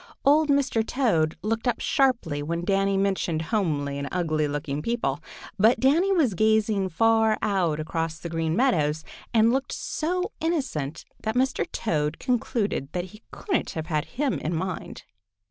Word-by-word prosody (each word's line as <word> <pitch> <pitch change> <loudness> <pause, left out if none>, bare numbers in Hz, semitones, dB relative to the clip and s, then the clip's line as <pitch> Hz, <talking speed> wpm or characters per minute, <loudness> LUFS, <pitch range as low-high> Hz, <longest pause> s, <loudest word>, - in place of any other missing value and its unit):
Old 300 +2 +5
Mr. 275 -5 +2
Toad 195 - +1
looked 225 +3 -1
up 240 - +1
sharply 245 - +1
when 170 +3 -3
Danny 195 0 +2
mentioned 190 -5 0
homely 145 -9 0
and 140 0 -4
ugly 155 -4 0
looking 145 0 -3
people, 190 - -1 0.4
but 220 +5 +5
Danny 325 +9 +3
was 310 - +3
gazing 215 -1 +2
far 225 +4 +3
out 180 -7 +1
across 160 +1 -2
the 170 - -7
Green 165 -1 -1
Meadows 160 - +2 0.3
and 230 0 +4
looked 270 +1 -1
so 360 +4 -2
innocent 260 - -2 0.2
that 220 +1 -2
Mr. 260 +1 0
Toad 150 -8 -1
concluded 230 - -1
that 180 0 -2
he 215 - -14
couldn't 380 -5 -2
have 160 - -3
had 155 -2 -1
him 275 0 -2
in 165 +2 -2
mind. 185 +2 -4
200 Hz, 155 wpm, -25 LUFS, 160-245 Hz, 0.4 s, Old